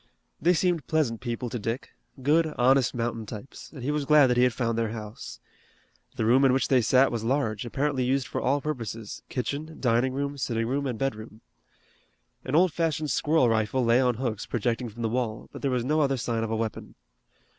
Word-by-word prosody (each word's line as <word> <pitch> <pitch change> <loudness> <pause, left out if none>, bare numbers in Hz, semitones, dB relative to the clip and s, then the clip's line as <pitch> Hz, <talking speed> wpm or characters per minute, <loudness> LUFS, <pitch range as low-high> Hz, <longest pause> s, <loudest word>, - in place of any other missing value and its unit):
They 175 +2 +4
seemed 175 -3 0
pleasant 140 -8 0
people 120 0 -3
to 120 - -3
Dick, 115 +5 -4 0.3
good, 155 +2 +2
honest 130 +1 +3
mountain 115 -2 -3
types, 110 +5 -9
and 135 -6 -9
he 140 - 0
was 150 -1 -1
glad 145 -3 +6
that - - +2
he - - +5
had 125 0 +4
found 115 -1 -1
their 115 -1 0
house. 110 -1 -8 0.8
The 110 - -1
room 125 +4 +5
in 135 -2 +5
which 130 -1 +1
they 130 -2 +4
sat 130 +4 +4
was 115 -2 -3
large, 115 -3 -1
apparently 135 +1 0
used 130 +1 +1
for - - -4
all 140 +3 +1
purposes, 115 -7 -5
kitchen, 145 +5 -4
dining 125 +1 +2
room, 140 +1 -3
sitting 115 -2 -1
room, 140 +4 -1
and 125 -3 -3
bedroom. 110 -4 -4 1.0
An 130 - -2
old 175 -1 +4
fashioned 155 -3 -1
squirrel 155 -4 +3
rifle 115 +3 +1
lay 115 +2 +4
on 125 -2 +2
hooks 115 -3 -3
projecting 120 +1 -1
from 115 +2 -8
the - - +2
wall, 115 -2 -3
but - - -8
there 140 - 0
was 125 -2 0
no 155 +3 +2
other 135 -2 +1
sign 115 -1 -2
of 115 - -3
a 110 - -1
weapon. 110 -1 -4
125 Hz, 210 wpm, -27 LUFS, 115-140 Hz, 1.0 s, glad